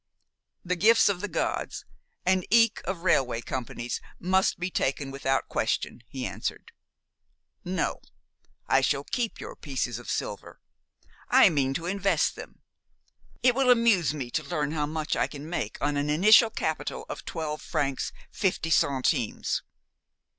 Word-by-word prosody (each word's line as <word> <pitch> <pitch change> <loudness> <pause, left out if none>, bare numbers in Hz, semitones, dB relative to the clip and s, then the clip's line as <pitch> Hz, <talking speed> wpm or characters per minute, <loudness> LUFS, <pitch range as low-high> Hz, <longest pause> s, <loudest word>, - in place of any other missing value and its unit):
"The 180 +1 0
gifts 220 +5 +5
of 185 -3 -1
the 205 - -2
gods, - - -2 0.4
and 185 0 +3
eke 230 +1 +4
of 185 -3 -4
railway 130 -10 +2
companies, 120 -1 -4 0.2
must 190 +1 +2
be 180 +1 -2
taken 135 -2 -1
without 135 0 -1
question," - - -1
he 130 +1 -5
answered. - - -5 0.9
"No, 185 +1 -2 0.7
I - - +4
shall - - +1
keep 240 -3 -3
your - - -8
pieces 130 -5 -3
of 120 - -10
silver. - - -4 0.7
I - - +7
mean 135 -3 0
to 170 - -3
invest 195 +2 +1
them. - - -11 0.8
It 250 -1 +6
will 265 0 +2
amuse 230 -9 +4
me 135 -5 -5
to 155 - -1
learn 150 -1 -2
how 150 -2 -1
much 155 0 -2
I - - +1
can 145 0 -9
make 175 - -3
on 145 +1 0
an 145 +1 -1
initial 210 +9 +6
capital - - -3
of - - -7
twelve 155 -3 -4
francs, 135 -2 -2 0.2
fifty 180 -4 -1
centimes. 130 -4 +1
160 Hz, 145 wpm, -27 LUFS, 140-190 Hz, 0.9 s, I